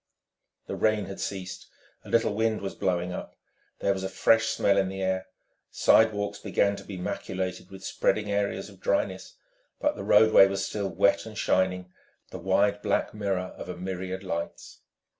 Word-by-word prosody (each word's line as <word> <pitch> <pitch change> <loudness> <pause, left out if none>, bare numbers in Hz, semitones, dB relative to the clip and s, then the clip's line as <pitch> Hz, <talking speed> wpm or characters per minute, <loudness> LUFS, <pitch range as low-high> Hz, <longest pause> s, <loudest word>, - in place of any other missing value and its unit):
The - - -5
rain 110 -2 +1
had 95 +1 -8
ceased. 95 -2 -5 0.4
A - - -12
little 115 -2 +2
wind 110 +1 0
was 95 - -4
blowing 90 -2 -1
up. - - -7 0.5
There 100 - +2
was 95 -1 -5
a 95 - -2
fresh 115 +2 +3
smell 100 -2 +2
in 95 -1 +1
the 95 0 -6
air. 95 0 -1 0.4
Sidewalks 105 -2 +3
began 100 0 +1
to - - -9
be 95 - -7
maculated 90 0 -4
with 95 0 -10
spreading 105 +1 0
areas 100 -1 -1
of 100 -2 -15
dryness, 95 -1 -1 0.4
but - - +1
the - - -6
roadway 110 -3 +7
was 95 0 -2
still 100 -2 -3
wet 100 +3 +2
and 110 -2 -9
shining, 90 -2 0 0.4
the - - -6
wide 100 +3 +2
black 100 -2 0
mirror 95 -3 -2
of - - -8
a 90 - -5
myriad 95 +1 -4
lights. 85 -2 -5
95 Hz, 175 wpm, -27 LUFS, 95-100 Hz, 0.5 s, roadway